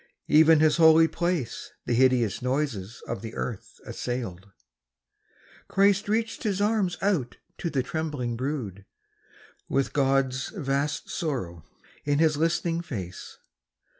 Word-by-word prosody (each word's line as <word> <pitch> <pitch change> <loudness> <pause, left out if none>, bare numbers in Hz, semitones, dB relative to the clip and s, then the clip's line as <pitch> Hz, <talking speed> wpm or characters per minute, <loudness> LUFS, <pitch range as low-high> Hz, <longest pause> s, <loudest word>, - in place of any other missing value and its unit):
(Even 160 0 +6
His 155 +1 +4
holy 160 0 +7
place 170 -8 -3
The - - 0
hideous 120 -4 +3
noises 125 -6 -2
of 115 - -4
the 115 0 -7
earth 115 -6 -6
assailed.) 105 -7 -5 1.2
Christ 200 +1 +2
reached 225 +1 -1
His 200 -3 -1
arms 205 -4 +1
out 175 -12 0 0.2
to 170 - -2
the 135 -5 0
trembling 145 -5 -3
brood, 115 -7 -4 0.8
With 135 - 0
God's 135 -2 +1
vast 145 -2 -2
sorrow 115 - -3 0.4
in 145 0 +1
His 155 -1 +3
listening 165 +2 0
face. 95 - -7
145 Hz, 120 wpm, -26 LUFS, 120-165 Hz, 1.2 s, holy